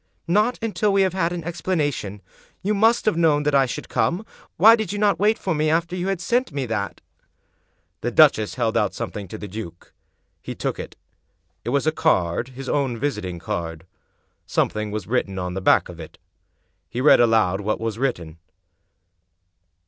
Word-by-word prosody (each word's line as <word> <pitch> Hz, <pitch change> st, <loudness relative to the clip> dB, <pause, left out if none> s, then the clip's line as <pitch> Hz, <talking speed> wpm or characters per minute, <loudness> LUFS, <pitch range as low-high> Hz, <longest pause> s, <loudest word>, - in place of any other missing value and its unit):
"Not 210 Hz, +8 st, +2 dB
until 210 Hz, -2 st, 0 dB
we 195 Hz, 0 st, +4 dB
have 190 Hz, -2 st, 0 dB
had 175 Hz, -2 st, 0 dB
an 175 Hz, -1 st, -4 dB
explanation. 145 Hz, -, -2 dB, 0.4 s
You 205 Hz, +2 st, +1 dB
must 225 Hz, +3 st, +3 dB
have 210 Hz, -6 st, +2 dB
known 155 Hz, -3 st, +3 dB
that 150 Hz, 0 st, 0 dB
I 135 Hz, -1 st, +4 dB
should -, -, -6 dB
come. 180 Hz, +6 st, 0 dB, 0.3 s
Why 220 Hz, +6 st, +8 dB
did 220 Hz, -5 st, -3 dB
you 205 Hz, -, -3 dB
not 205 Hz, -1 st, +2 dB
wait 215 Hz, +2 st, +3 dB
for 185 Hz, -, -2 dB
me 155 Hz, 0 st, +1 dB
after 170 Hz, +2 st, 0 dB
you 180 Hz, +1 st, -3 dB
had 195 Hz, -2 st, -1 dB
sent 245 Hz, +8 st, 0 dB
me 140 Hz, -2 st, -3 dB
that?" 105 Hz, -4 st, -3 dB, 1.0 s
The -, -, -1 dB
duchess -, -, +4 dB
held -, -, 0 dB
out -, -, +1 dB
something 100 Hz, -2 st, -5 dB
to 110 Hz, -, -8 dB
the 105 Hz, -, -7 dB
duke. 90 Hz, -4 st, -9 dB, 0.5 s
He -, -, -7 dB
took -, -, -3 dB
it. -, -, -7 dB, 0.7 s
It -, -, -4 dB
was 140 Hz, +3 st, +1 dB
a 155 Hz, -, +3 dB
card— 120 Hz, -, +1 dB
his 135 Hz, -1 st, -7 dB
own 135 Hz, -5 st, 0 dB
visiting 105 Hz, -9 st, -3 dB
card. 80 Hz, -1 st, -5 dB, 0.6 s
Something 105 Hz, 0 st, -1 dB
was 105 Hz, 0 st, -4 dB
written 105 Hz, -5 st, -1 dB
on 90 Hz, -1 st, -3 dB
the 95 Hz, -, -4 dB
back -, -, +4 dB
of 85 Hz, -1 st, -11 dB
it. 80 Hz, -, -10 dB, 0.7 s
He 120 Hz, -, -4 dB
read 145 Hz, +4 st, +6 dB
aloud 110 Hz, -5 st, +3 dB
what 105 Hz, +2 st, -1 dB
was 115 Hz, 0 st, -3 dB
written. 85 Hz, -, -3 dB
140 Hz, 185 wpm, -23 LUFS, -, 1.0 s, Why